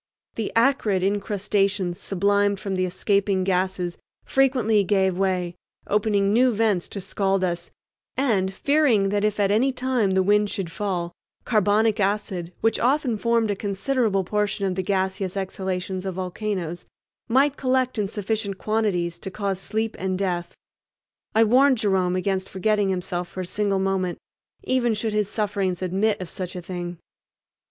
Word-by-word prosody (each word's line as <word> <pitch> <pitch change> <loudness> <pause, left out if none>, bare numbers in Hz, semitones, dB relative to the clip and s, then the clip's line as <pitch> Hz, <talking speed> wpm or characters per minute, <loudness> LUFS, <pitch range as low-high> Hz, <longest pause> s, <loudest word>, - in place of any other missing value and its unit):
The 225 - -3
acrid 230 -6 +2
incrustations 200 -2 0
sublimed 200 +1 +1
from 195 0 -4
the 185 -1 0
escaping 195 +1 +1
gases 185 -1 -1 0.3
frequently 250 -6 +3
gave 190 -1 +2
way, 180 -2 0 0.3
opening 205 -1 +2
new 250 +2 +4
vents 210 -5 +1
to 200 - -4
scald 195 0 0
us; 175 -1 -2 0.5
and, 210 -8 +1
fearing 250 -4 +2
that 205 +1 0
if 210 0 0
at 200 -1 +3
any 245 +6 +3
time 250 -6 0
the 190 - +4
wind 205 +1 +3
should 190 -4 -4
fall, 180 -3 -2 0.3
carbonic 215 0 +2
acid, 195 -3 -1
which 225 -1 +2
often 260 -1 +2
formed 230 0 +1
a - - -1
considerable 205 +1 0
portion 210 +1 -1
of 190 - 0
the 190 - -1
gaseous 190 0 -1
exhalations 190 -1 -3
of 190 -2 -4
volcanoes, 185 -2 -3 0.5
might 270 +4 +3
collect 255 -3 0
in 205 - +1
sufficient 205 -1 -2
quantities 195 -6 -1
to - - -6
cause 195 -1 -2
sleep 220 +3 -2
and 185 0 -1
death, 175 -3 -2 0.8
I 225 - +6
warned 260 +4 +5
Jerome 190 -4 +1
against 190 0 -1
forgetting 205 +1 +1
himself 180 -1 -2
for 185 - -5
a - - -4
single 200 +2 0
moment, 190 -2 0 0.5
even 240 -3 +1
should 215 0 -2
his 210 -2 0
sufferings 200 -4 -1
admit 195 +4 +1
of 185 - -5
such 180 +1 -5
a 180 - -4
thing. 175 -1 -5
200 Hz, 155 wpm, -24 LUFS, 185-215 Hz, 0.8 s, I